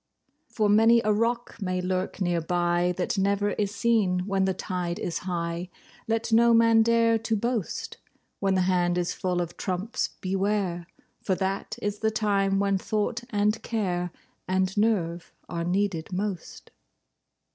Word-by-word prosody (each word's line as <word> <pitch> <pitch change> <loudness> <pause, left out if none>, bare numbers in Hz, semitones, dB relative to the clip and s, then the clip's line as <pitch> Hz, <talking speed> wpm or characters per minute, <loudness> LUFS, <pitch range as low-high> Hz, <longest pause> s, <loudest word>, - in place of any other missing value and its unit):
For 215 -6 0
many 225 +3 +6
a 215 - +3
rock 230 +1 -1
may 185 -1 -1
lurk 185 +1 -2
near 175 -3 0
by, 175 +1 +1
That 185 +2 -1
never 200 +1 +1
is 205 0 -1
seen 200 -4 +1
when 195 -1 +1
the 190 - +1
tide 180 -2 -3
is 170 - -3
high— 170 0 -3 0.4
Let 225 +1 -1
no 235 +1 +6
man 230 0 +5
dare 230 0 +3
to 225 0 -1
boast, 230 -2 -2 0.4
When 195 -1 +1
the 185 - +3
hand 180 -1 +2
is 175 -1 0
full 180 -1 -1
of 175 0 -5
trumps—beware, 190 -2 -2 0.3
For 190 - 0
that 195 +3 -3
is 205 0 -2
the 220 - +2
time 200 -3 +1
when 200 -1 +1
thought 215 +4 -2
and 210 +1 +1
care 180 -6 -1 0.4
And 185 +1 0
nerve 185 -6 0 0.2
are 170 0 -3
needed 180 -1 -1
most. 190 -1 -5
195 Hz, 150 wpm, -26 LUFS, 180-215 Hz, 0.4 s, many